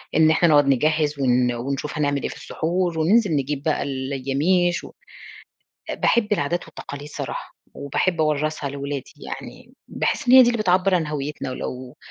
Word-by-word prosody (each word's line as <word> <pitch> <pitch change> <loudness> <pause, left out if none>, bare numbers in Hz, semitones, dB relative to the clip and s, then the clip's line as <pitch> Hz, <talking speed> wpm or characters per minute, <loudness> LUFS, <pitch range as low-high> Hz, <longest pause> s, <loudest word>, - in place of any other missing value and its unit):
إن 160 0 +5
إحنا 170 +2 +3
نقعد 145 -1 +5
نجهّز 150 +2 +1
ون 125 -2 +2
ونشوف 140 +5 -4
هنعمل 145 -2 0
إيه - - -1
في - - -8
السحور، 170 0 -2
وننزل 200 +3 +3
نجيب 140 0 -2
بقى 155 -1 0
الياميش، 140 +7 0
و - - -10 1.0
باحب 215 -3 +1
العادات 175 -2 0
والتقاليد 145 -2 -9
صراحة، - - -6 0.2
وباحب 165 +5 -1
أورّثها 155 -1 0
لولادي 140 0 -5
يعني، - - -9
باحس - - -2
إن - - +5
هي 260 0 +10
دي 240 - +4
اللي 235 - -2
بتعبّر 185 0 +3
عن 165 -4 +1
هَويتنا، 150 -2 -4
ولو 130 0 -6
150 Hz, 160 wpm, -22 LUFS, 140-175 Hz, 1.0 s, هي